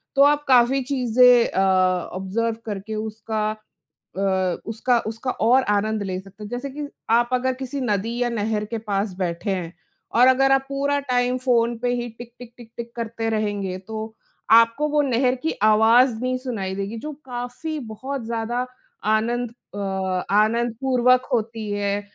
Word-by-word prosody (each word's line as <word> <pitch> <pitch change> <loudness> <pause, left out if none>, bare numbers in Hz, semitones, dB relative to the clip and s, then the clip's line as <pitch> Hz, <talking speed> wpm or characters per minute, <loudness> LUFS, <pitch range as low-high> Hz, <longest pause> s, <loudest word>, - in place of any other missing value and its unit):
तो 275 - +4
आप 295 +1 +4
काफ़ी 260 +1 +5
चीज़ें 250 -2 +4
अ, - - -1 0.5
ऑब्जर्व 210 +5 -2
करके 210 0 -5
उसका 215 0 -3 0.7
अ, - - -1 0.4
उसका 230 +3 +1
उसका 225 +3 -3
और 250 +4 +3
आनंद 210 +1 +1
ले 185 -2 -3
सकते 195 +2 -13
हैं। 205 - -7
जैसे 245 +4 -4
कि 290 +2 -6 0.2
आप 240 +1 +4
अगर 255 +1 +1
किसी 265 +2 -5
नदी 225 0 -1
या 245 - +2
नहर 215 -2 -1
के 230 +2 -4
पास 205 -2 -2
बैठे 175 +2 -2
हैं 175 -3 -3 0.4
और 245 +2 +7
अगर 270 +1 +4
आप 270 0 +3
पूरा 280 +1 0
टाइम 250 0 +2
फ़ोन 240 -2 +1
पे 245 +1 -1
ही 240 0 -3
टिक 240 -1 -10
टिक 240 -1 -11
टिक 235 -2 -14
टिक 235 0 -6
करते 230 -1 -3
रहेंगे 205 -4 -2
तो, 220 +3 -7 0.4
आपको 230 +6 +5
वो 295 0 +3
नहर 255 -2 +2
की 320 - +1
आवाज़ 225 +3 +5
नहीं 255 0 0
सुनाई 220 -8 -4
देगी 200 +3 -4
जो 300 +6 -6
काफ़ी 250 +5 -5 0.2
बहुत 270 +4 -5
ज़्यादा 235 +2 -2 0.5
आनंद 235 +2 0 0.2
अ, - - -6 0.5
आनंदपूर्वक 240 +4 +2
होती 225 -2 -2
है 205 0 -1
235 Hz, 165 wpm, -23 LUFS, 215-255 Hz, 0.7 s, और